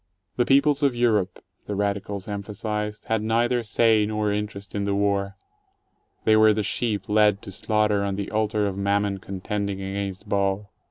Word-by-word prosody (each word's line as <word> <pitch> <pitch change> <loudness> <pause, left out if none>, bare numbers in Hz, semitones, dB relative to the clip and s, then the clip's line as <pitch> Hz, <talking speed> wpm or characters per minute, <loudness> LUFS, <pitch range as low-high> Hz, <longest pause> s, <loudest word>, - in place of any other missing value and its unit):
The 120 - +1
peo 135 +1 +6
ples 145 -1 +1
of 140 -4 +2
Europe, 110 -6 +1 0.2
the 105 - -3
radicals 100 -1 -2
emphasized, 105 +1 -4
had 110 -1 +1
neither 120 +3 +1
say 110 -1 +3
nor 105 -1 0
interest 105 -1 -5
in 100 -1 -1
the 100 0 0
war: 100 -1 0 0.9
they 110 - +5
were 110 0 +6
the 105 0 -1
sheep 105 -2 -2
led 105 -1 +4
to 100 - -8
slaughter 105 +1 +1
on 100 -1 -1
the 100 0 -4
altar 105 -1 +1
of 100 -2 -2
Mammon 100 0 0
contending 100 +1 -4
against 95 +1 -4
Baal. 100 0 0
105 Hz, 170 wpm, -24 LUFS, 100-110 Hz, 0.9 s, peo